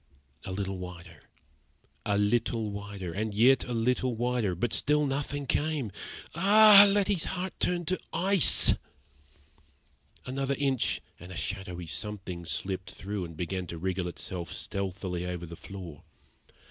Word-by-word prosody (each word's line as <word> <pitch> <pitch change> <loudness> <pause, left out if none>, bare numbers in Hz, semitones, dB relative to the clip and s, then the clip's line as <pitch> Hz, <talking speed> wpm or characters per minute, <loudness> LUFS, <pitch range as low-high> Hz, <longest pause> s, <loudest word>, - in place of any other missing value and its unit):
A 95 - -4
little 95 0 -3
wider 90 -3 -10 0.8
a 100 -1 +2
little 110 +1 +1
wider 100 -3 -6
and 105 +2 -3
yet 125 +5 +5
a 125 - -6
little 125 +1 +1
wider; 120 -5 0
but 110 +6 -1
still 150 +1 +2
nothing 140 +1 -2
came. 145 -4 -1 0.4
Ah! 205 +3 +8
Letty's 200 -3 +2
heart 185 0 -3
turned 175 -2 +1
to 185 - 0
ice. 185 0 +5 1.5
Another 135 +1 -1
inch, 135 -3 +1 0.2
and 90 +2 -11
a - - -7
shadowy 90 -2 -4
something 90 +2 -4
slipped 95 +3 -3
through 100 -1 -5
and 85 -2 -10
began 90 +1 -3
to 85 - -6
wriggle 90 +1 -2
itself 90 0 -6
stealthily 95 -2 -3
over 90 -1 -4
the 85 0 -9
floor. 85 -3 -9
105 Hz, 135 wpm, -29 LUFS, 90-135 Hz, 1.5 s, Ah